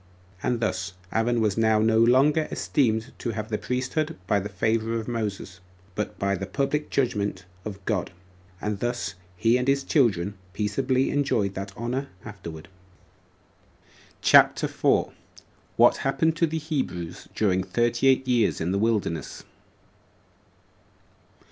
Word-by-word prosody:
And 125 -2 0
thus 95 -4 -2 0.2
Aaron 115 +1 +1
was 105 0 +1
now 110 -1 +4
no 110 +1 +3
longer 135 +7 +4
esteemed 115 -2 0
to 120 - -3
have 110 0 -5
the 105 - -2
priesthood 145 +5 -2
by 105 -2 +2
the 100 +1 -5
favor 110 +3 0
of 115 -1 -3
Moses, 105 -6 -4 0.3
but 105 +2 -4
by 100 0 0
the 95 -1 -3
public 140 +7 -1
judgment 105 -7 -1 0.2
of 100 -3 -7
God; 105 -5 -1 0.5
and 105 0 -3
thus 120 -1 -2 0.2
he 115 +6 +3
and 125 +1 -2
his 140 0 +2
children 105 - +2 0.2
peaceably 110 +6 0
enjoyed 115 -9 +1
that 95 +1 -5
honor 125 +4 -2 0.2
afterward. 85 -7 -9 1.6
CHAPTER - - +6
4. - - +1 0.6
What - - +5
Happened 160 +4 +1
To 170 - +3
The 160 +1 -3
Hebrews 130 - -4
During 95 -3 +2
Thirty 120 +5 +1
Eight 130 0 +3
Years 120 -4 +2
In 85 +2 -1
The 100 - 0
Wilderness. 105 -8 -1
115 Hz, 135 wpm, -25 LUFS, 100-130 Hz, 1.6 s, CHAPTER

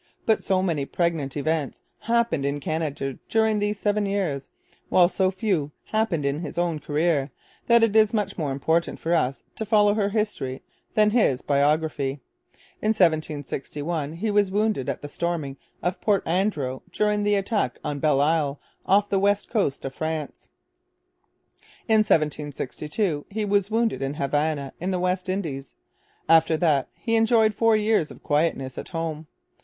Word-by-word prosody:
But 220 - +2
so 185 -1 +1
many 160 -7 0
pregnant 160 -4 -1
events 150 0 -2 0.2
happened 230 -10 +1
in 140 +1 -1
Canada 145 -3 -3
during 220 -1 +2
these 205 0 -1
seven 205 -1 +1
years, 175 -9 -2 0.4
while 180 -1 +6
so 190 +1 +1
few 185 -7 -1 0.2
happened 215 -9 0
in 140 +2 0
his 170 - -6
own 170 -3 0
career, 150 -2 0 0.4
that 235 -1 +5
it 225 -2 +2
is 215 -1 +5
much 205 -3 -1
more 150 -5 -2
important 160 +5 0
for 165 - -1
us 135 -5 0
to - - -2
follow 210 -1 +4
her 205 -2 +1
history 205 - -2 0.3
than 210 -1 +4
his 210 - +2
biography. 145 -1 +1 0.6
In 215 +1 +2
1761 155 -1 -1
he 210 +6 -2
was 205 -1 +3
wounded 205 - 0
at - - -4
the - - -4
storming 155 -3 -3 0.3
of 175 +1 -2
Port 205 -3 +1
Andro 160 -8 -1
during 210 0 +1
the 205 0 +2
attack 200 - -1
on 145 -2 -3
Belle 145 -2 +3
Isle 150 -2 +1 0.3
off 200 +2 +4
the 195 -1 +1
west 200 +1 +1
coast 195 - 0
of 135 - -4
France. 155 -1 -4 1.4
In 220 -1 +4
1762 150 - -1
he 215 +1 -2
was 200 -1 +1
wounded 225 -6 0
at 135 +1 -2
Havana 145 -1 -1
in 180 - -1
the 185 -1 0
West 185 +1 -1
Indies. 155 -9 -4 0.5
After 160 0 +5
that 150 -5 +2
he 230 -2 -1
enjoyed 225 -1 +4
four 225 +1 +3
years 215 -6 +2
of - - -13
quietness 145 -3 0
at - - -7
home. 160 -2 -4
170 Hz, 160 wpm, -25 LUFS, 145-205 Hz, 1.4 s, while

